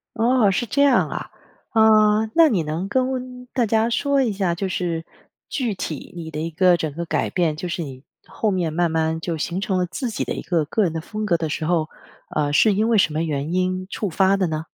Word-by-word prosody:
哦， 230 -1 +3
是 240 - 0
这 280 +6 0
样 285 -1 +4
啊。 - - -6 0.4
啊， 215 -1 +5
那 330 -1 +7
你 185 - +1
能 160 +5 -3
跟 255 0 -2
大 245 -3 +2
家 220 +2 +2
说 280 +3 +1
一 230 -5 0
下， 190 -3 0
就 190 +2 -2
是 170 -3 -2 0.4
具 245 -7 -1
体 155 -5 -6
你 160 -2 -7
的 150 - -5
一 165 +2 -2
个 180 +2 +4
整 155 -2 -3
个 170 +2 -4
改 - - -1
变 170 -4 0
就 175 +3 -5
是 170 0 -3
你 135 -2 -9 0.2
后 220 - -2
面 175 -5 -1
慢 175 0 +1
慢 160 0 0
就 165 -2 -3
形 175 +5 -3
成 195 -2 0
了 180 - +1
自 240 +8 -4
己 - - -2
的 - - -3
一 - - -5
个 165 -4 0
个 215 +8 0
人 175 - +1
的 160 - -2
风 215 +6 -5
格 170 -5 +2
的 165 - -2
时 155 +1 -3
候， 165 -2 +1 0.5
呃， 145 -1 +1
是 210 +7 +4
因 215 +3 +1
为 230 - +4
什 185 -6 +3
么 155 - -1
原 155 0 -2
因 185 0 -1
触 205 -2 -3
发 190 +3 +3
的 190 -2 +1
呢？ 160 0 -3
185 Hz, 255 characters per minute, -22 LUFS, 160-220 Hz, 0.5 s, 那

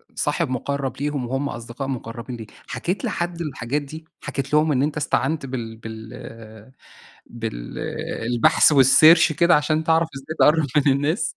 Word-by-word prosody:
صاحب - - -1
مقرَّب 135 +1 -3
ليهم 145 -3 -2
وهُم 135 +3 -2
أصدقاء 120 +3 -6
مقربين 120 -1 -6
ليك، 110 -2 -10 0.2
حكيت 190 +8 -3
لحد 175 -5 -3
الحاجات 145 -2 -3
دي، 155 +3 -10 0.2
حكيت 140 +1 -5
لهم 150 +1 +4
إن 135 -1 +2
أنت 150 +1 -2
استعنت 150 +1 -1
بال 120 -4 -6
بال 110 0 -9 1.2
بال 110 - -6 0.4
البحث 120 +5 +4
والsearch 155 +4 +6
كده 170 +3 +4
عشان 155 +1 0
تعرَف 165 0 +2
إزاي 140 +4 -7
تقرب 155 0 +5 0.2
من 140 - +6
الناس؟ 145 - -1
140 Hz, 150 wpm, -22 LUFS, 120-155 Hz, 1.2 s, والsearch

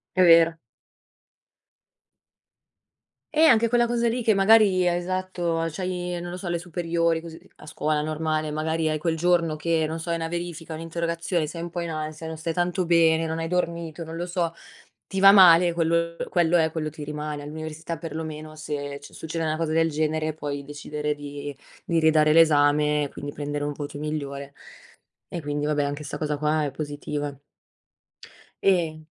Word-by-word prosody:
È 185 - +4
vero. 165 -1 +6 2.8
Eh 310 - +4
anche 230 -6 +5
quella 240 0 +3
cosa 235 0 +1
lì 240 +2 -1
che 225 - +4
magari 195 -1 +5
è 175 - +2
esatto 175 -2 -2
c'hai 180 +1 -3
non 175 0 -6
lo 180 - -6
so, 185 -2 -5
le 170 - 0
superiori, 170 -1 -1
così 165 -1 -10 0.2
a - - -14
scuola 155 -1 -1
normale, 155 0 -1
magari 160 +1 -1
hai 155 - 0
quel 160 +1 -1
giorno 170 -2 +2
che 160 +1 0
non 160 +1 -4
so, 165 - -7
hai 170 - +1
una 165 0 -3
verifica, 170 -1 -5
un'interrogazione, 165 +1 -2
sei 165 +2 -7
un 170 - -4
po' 175 +1 -4
in 170 -1 -4
ansia, 155 +1 -5
non 160 0 -6
stai 165 +1 -3
tanto 175 +1 0
bene, 165 -1 +4
non 160 0 -3
hai 165 - -2
dormito, 170 -2 -2
non 165 0 -7
lo 175 - -3
so. 175 -2 -2 0.5
Ti 195 -1 -3
va 195 0 +9
male 175 -3 +7
quel 170 0 0
quello 175 -1 +3
è, 160 -1 +3
quello 155 -2 -2
ti 150 0 -8
rimane. 150 0 -5
All'università, 155 +2 -6
perlomeno, 155 -1 -6
se 145 -2 -5
succede 160 +2 -5
una 155 0 0
cosa 160 -1 -1
del 165 0 +2
genere, 155 +1 -1
puoi 145 -2 -5
decidere 150 +1 -4
di 145 0 -7 0.3
di 165 -1 0
ridare 155 -1 +4
l'esame, 150 -2 +4
quindi 145 0 -6
prendere 145 0 -3
un 145 - -2
voto 145 0 -7
migliore 140 -2 -5 0.7
e 170 - -5
quindi, 145 0 -2
vabbè, 150 -1 +1
anche 145 +1 -3
sta 145 - -5
cosa 150 -1 -2
qua 150 +1 +1
è 140 - -2
positiva. 145 -1 -5 1.3
E 165 -5 +1
160 Hz, 175 wpm, -25 LUFS, 150-170 Hz, 2.8 s, va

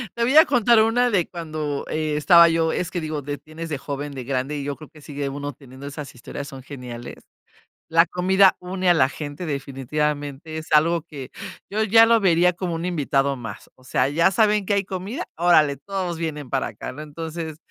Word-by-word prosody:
Te 235 - 0
voy 260 +5 +2
a 315 - +10
contar 235 -3 +4
una 245 +2 +2
de 190 -7 +1
cuando 155 -4 -4
estaba 155 +3 +5
yo, 165 0 +1
es 180 - -2
que 175 - -3
digo, 155 -1 -3
de 145 +1 -5
tienes 160 +2 -9
de 150 - -2
joven, 140 +1 -5
de 130 -2 -6
grande, 135 +3 -2
y 140 - -4
yo 140 0 -3
creo 155 0 -13
que 155 - -17
sigue 145 -1 -4
uno 145 +1 -5
teniendo 130 +1 -13
esas 145 0 -7
historias, 140 +3 -7
son 135 -2 -10
geniales. 125 -4 -8 0.7
La 165 +1 +5
comida 190 +3 +4
une 185 +1 -2
a 175 - +6
la 130 -5 +4
gente 145 +4 -6
definitivamente, 145 +2 -3
es 160 - -8
algo 165 +2 +4
que, 145 -5 -9 0.4
yo 215 +2 -1
ya 225 +2 +6
lo 230 0 +4
vería 180 -2 +4
como 175 -1 -4
un 165 +1 -4
invitado 140 -5 0
más, 115 -5 -8
o 130 - -24
sea, 130 0 0
ya 165 +6 +3
saben 210 +1 +2
que 205 - 0
hay 200 0 +1
comida, 195 +5 -5
órale 155 -4 +4
todos 185 +2 -4
vienen 150 -5 -5
para 135 - 0
acá 110 -2 -7
¿no?, 150 - -8
entonces, 160 +1 -6
155 Hz, 205 wpm, -23 LUFS, 140-180 Hz, 0.7 s, a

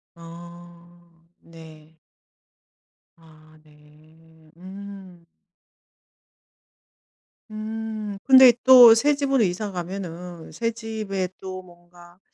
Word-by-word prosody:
어. 170 0 -16
네. 160 -1 -17 1.2
아 155 -1 -22
네. 155 +1 -24
음 190 -1 -13 2.3
음. 215 -1 -7
근데 260 -2 +7
또 245 -3 +8
새집으로 275 -1 0
이사 195 +3 -3
가면은 175 -2 -8
새집에 220 -5 -5
또 185 -1 -8
뭔가 175 0 -20
175 Hz, 115 characters per minute, -22 LUFS, 165-215 Hz, 2.3 s, 또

